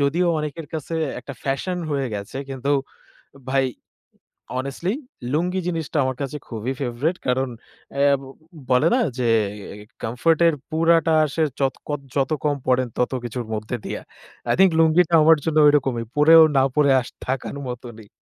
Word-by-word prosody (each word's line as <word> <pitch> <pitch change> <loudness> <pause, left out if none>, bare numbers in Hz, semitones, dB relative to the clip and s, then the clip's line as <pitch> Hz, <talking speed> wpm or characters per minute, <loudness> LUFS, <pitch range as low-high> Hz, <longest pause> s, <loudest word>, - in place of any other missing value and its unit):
যদিও 155 +6 +2
অনেকের 150 +1 -5
কাছে 160 +1 -4 0.3
একটা 140 - -8
ফ্যাশন 180 +7 -2
হয়ে 140 -2 0
গেছে। 100 +4 -6
কিন্তু 135 +1 -1 0.8
ভাই 135 0 +2 0.9
অনেস্টলি, 140 +8 -2 0.4
লুঙ্গি 180 +4 0
জিনিসটা 165 -2 -3
আমার 130 0 -1
কাছে 140 +1 -3
খুবই 115 +2 -4
ফেভরেট। 135 +8 -1
কারণ 130 +1 +1 0.5
অ্যা 140 0 +4 0.6
বলে 125 +5 +4
না? - - +2 0.2
যে 125 - 0 0.5
এ 105 +1 -11 0.2
কমফোর্ট 125 +8 +1
এর 165 - +3 0.2
পুরাটা 165 0 +3
আসে 155 +2 -1 0.2
যত 135 -1 +1
কদ 145 -1 -1 0.2
যত 135 0 +1
কম 145 -1 +2
পড়েন 130 0 +2
তত 125 - +1
কিছুর 120 0 -4
মধ্যে 110 +3 -3
দিয়া। - - -4 0.5
আই - - +3
থিংক 190 -1 +6
লুঙ্গিটা 165 +1 +4
আমার 160 +1 +6
জন্য 160 -1 0
ঐরকমই। 135 -5 +2
পড়েও 160 +2 +8
না 135 - +5
পড়ে 145 -2 +4
আস 120 - -9 0.2
থাকার 130 +2 -3
মতনই। 120 -3 -9
140 Hz, 155 wpm, -22 LUFS, 125-160 Hz, 0.9 s, পড়েও